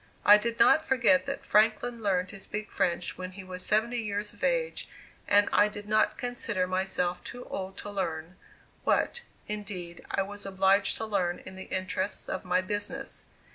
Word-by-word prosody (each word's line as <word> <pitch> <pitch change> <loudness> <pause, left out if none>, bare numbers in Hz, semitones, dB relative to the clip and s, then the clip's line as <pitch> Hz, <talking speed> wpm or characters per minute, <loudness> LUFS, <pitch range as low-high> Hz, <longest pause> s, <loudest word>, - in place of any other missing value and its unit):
I 210 +1 +9
did 235 +1 -2
not 315 +7 +6
forget 235 -11 +3
that - - -4
Franklin 220 +3 +3
learned 185 -3 +1
to 200 - -9
speak 210 +2 -5
French 170 0 -1
when 185 0 -5
he 195 0 -8
was 185 0 -7
seventy 235 +3 +1
years 210 -1 -3
of - - -14
age, - - 0 0.4
and 205 0 +5
I 205 - +6
did 205 0 -8
not 215 0 +2
consider 230 -6 -1
myself 185 -1 -1
too 245 0 -8
old 190 0 -5
to 205 - -6
learn, 165 -3 -3 0.5
what, 480 - +1 0.3
indeed, 195 -5 -6
I 195 - +1
was 205 +1 -7
obliged 195 +1 +3
to 225 - -3
learn 185 -5 0
in 190 - -8
the 190 - -7
interests 185 +1 -2
of 185 - -3
my 180 +1 +2
business. 205 +2 -3
200 Hz, 175 wpm, -29 LUFS, 185-215 Hz, 0.5 s, I